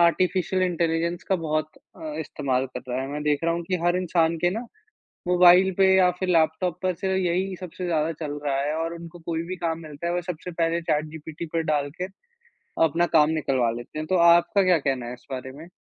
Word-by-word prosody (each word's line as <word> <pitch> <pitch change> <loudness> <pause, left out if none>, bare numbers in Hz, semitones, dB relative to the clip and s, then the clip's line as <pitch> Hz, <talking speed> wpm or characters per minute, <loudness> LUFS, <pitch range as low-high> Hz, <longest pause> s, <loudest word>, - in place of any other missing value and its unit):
Artificial 185 +2 +2
intelligence 170 -1 0
का 190 - +3
बहुत 155 -2 -2 0.3
अ, 155 -1 -6
इस्तेमाल 130 -4 -1
कर 130 - -8
रहा 125 +1 -2
है। 135 - -5
मैं 150 +1 -4
देख 150 -1 +1
रहा 170 - +2
हूँ 170 - -3
कि 185 - +1
हर 175 +1 +3
इंसान 170 -2 +1
के 175 - +4
ना 225 +6 -4 0.6
मोबाइल 180 +1 +6
पे 195 - +6
या 185 -1 +5
फिर 185 - -1
लैपटॉप 165 +1 +1
पर 185 -1 +1
से 190 +3 -3
यही 185 +1 0
सबसे 180 0 -7
ज़्यादा 160 -1 0
चल 145 - -3
रहा 140 -2 0
है 150 +2 -1
और 165 +1 -2
उनको 170 0 -10
कोई 165 -1 -1
भी 180 +2 -5
काम 165 -2 -2
मिलता 155 +1 -7
है, 170 - 0
वो 180 - 0
सबसे 180 0 -6
पहले 165 0 0
चैटजीपीटी 155 +1 -3
पर 165 - +2
डाल 145 -1 0
के - - 0 0.8
अपना 165 +2 +2
काम 150 0 +5
निकलवा 130 -5 +1
लेते 120 +5 -9
हैं। 155 - -4
तो 185 - +1
आपका 175 +4 +4
क्या 185 -2 +4
कहना 135 -4 -1
है 120 - -5
इस 125 0 -14
बारे 130 0 -5
में? 155 +5 -11
165 Hz, 220 wpm, -25 LUFS, 150-180 Hz, 0.8 s, मोबाइल